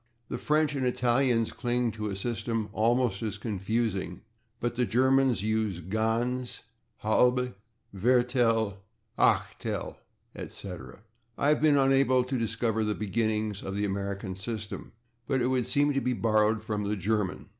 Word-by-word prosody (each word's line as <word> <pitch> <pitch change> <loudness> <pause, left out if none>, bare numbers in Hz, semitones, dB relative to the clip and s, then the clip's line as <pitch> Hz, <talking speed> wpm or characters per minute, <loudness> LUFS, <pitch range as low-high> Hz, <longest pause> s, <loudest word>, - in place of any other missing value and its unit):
The - - -3
French 155 0 +2
and 135 -2 -2
Italians 125 -1 +2
cling 120 -2 0
to 105 -1 -4
a 95 - -3
system 115 +1 -2
almost 115 -2 +2
as 105 -2 -3
confusing, 105 -3 -2 0.4
but 120 0 -1
the 125 +1 0
Germans 130 -2 +3
use 110 -4 0
/ganze/, 115 +7 -1 0.4
/halbe/, 125 +3 +3 0.4
/viertel/, 115 -1 +2 0.4
[Pg114] - - +4
/achtel/, - - -4 0.4
etc. 90 -5 -8 0.3
I 145 - +2
have 150 - +3
been 150 -2 +5
unable 135 -2 +4
to 130 0 -2
discover 110 0 0
the 105 -1 0
beginnings 110 -1 -1
of 95 0 -5
the 105 +1 0
American 100 -1 -3
system, 105 +1 -6 0.4
but 135 -2 +1
it 120 - +1
would 130 -2 +1
seem 145 0 +2
to 135 - 0
be 125 - 0
borrowed 110 -1 +2
from 105 -1 -2
the 105 +1 0
German. 100 -1 -1
115 Hz, 145 wpm, -28 LUFS, 105-125 Hz, 0.4 s, been